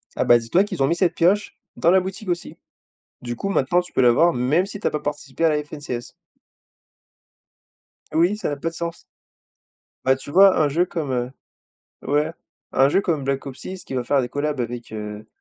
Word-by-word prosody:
ah - - +1
bah, 120 - +6
dis-toi 120 +12 +2
qu'ils 185 -8 -2
ont 135 - +3
mis 170 - +1
cette 175 0 +1
pioche 195 +4 +2 0.2
dans 170 - +2
la 190 +2 +6
boutique 190 +2 -6
aussi. 175 -1 -3 0.7
Du 120 -1 -4
coup, 195 - -4
maintenant 175 0 +2
tu 180 - -13
peux - - +2
l'avoir 130 +8 +5
même 130 +9 +2
si 205 0 -7
tu - - -10
as - - +2
pas 150 - -2
participé 145 0 -4
à 160 - +5
la 150 -1 0
FNCS. 145 -5 -7 2.0
Oui 175 +5 +3
ça 215 - -2
n'a 145 - -2
pas 165 +4 -2
de - - -16
sens. 170 0 -5 1.0
Bah 130 0 +4
tu 135 +2 -10
vois 195 +2 +6
un 155 - +4
jeu 170 +5 +2
comme, 160 -6 -4
heu 125 0 -1 0.7
ouais 150 +3 0 0.4
un 135 +1 +4
jeu 170 - +3
comme 160 -8 -1
Black 135 0 -2
Ops 130 -2 -7
6 185 -2 -8
qui - - -7
va 125 -1 -1
faire 140 +3 +2
des 125 - -3
collabs 145 +1 -2
avec, 120 -1 -5
heu 105 0 -6
150 Hz, 210 wpm, -22 LUFS, 130-175 Hz, 2.0 s, bah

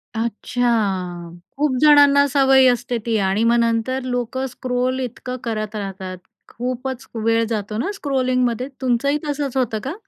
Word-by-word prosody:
अच्छा. 205 -7 -1 0.3
खूप 285 -3 +1
जणांना 285 -1 +6
सवय 270 -1 +5
असते 245 0 -2
ती. 225 -2 +1
आणि 195 +2 +1
मग 235 +1 +4
नंतर 230 +3 0
लोकं 250 +1 -2
स्क्रोल 255 0 -2
इतकं 250 0 -5
करत 215 -2 -3
राहतात, 190 -2 -5 0.3
खूपच 255 +1 -5
वेळ 225 +1 +1
जातो 210 -1 -3
ना 275 - -1
स्क्रोलिंगमध्ये. 255 - 0
तुमचंही 260 +3 +1
तसंच 285 -2 -2
होतं 225 -4 0
का? 275 - -3
245 Hz, 135 wpm, -21 LUFS, 220-260 Hz, 0.3 s, जणांना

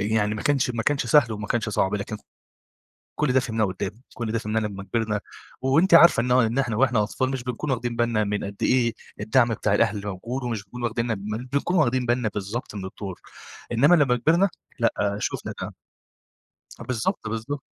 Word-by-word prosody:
يعني 105 +1 +1
ما 105 - -5
كانش 140 -3 +2
ما 115 -2 -2
كانش 140 -1 0
سهل 115 -2 +4
وما 105 -1 -5
كانش 115 0 -1
صعب 95 -1 +1
لكن 105 +1 -3 1.0
كل 150 -4 +2
ده 130 - +5
فهمناه 110 -3 0
قدّام، 95 0 -3 0.2
كل 115 -3 -4
ده 115 - 0
فهمناه 110 0 -1
لمّا 100 -2 -4
كبرنا، 105 +1 -1 0.4
وأنتِ 160 +8 +3
عارفة 170 -7 +8
إن 125 - -2
هو 125 +1 +6
إن 115 +2 0
إحنا 125 -5 0
وإحنا 120 -4 +3
أطفال 130 +5 -1
مش 130 -2 -3
بنكون 130 +3 -3
واخدين 120 -1 -2
بالنا 115 -2 +1
من 105 0 -2
قد 100 0 -6
إيه 120 -3 +3 0.3
الدعم 120 +3 +3
بتاع 105 -1 0
الأهل 105 0 +1
موجود 115 +7 -4
ومش 115 -4 -3
بنكون 120 +5 -9
واخدينا 115 0 -1
بن 105 +4 -5
بنكون 140 +6 0
واخدين 130 -4 +2
بالنا 120 -2 +1
بالضبط 105 +3 -5
من 95 -2 -5
الدور، 95 -1 -7 0.5
إنمّا 140 +9 +5
لمّا 140 -6 +3
كبرنا 170 +9 +3 0.3
لأ 100 -3 +1
شوفنا - - -3
ده. - - -6 1.1
بالضبط، 115 -2 -2
بالضبط. 115 +6 -4
115 Hz, 190 wpm, -24 LUFS, 105-130 Hz, 1.1 s, عارفة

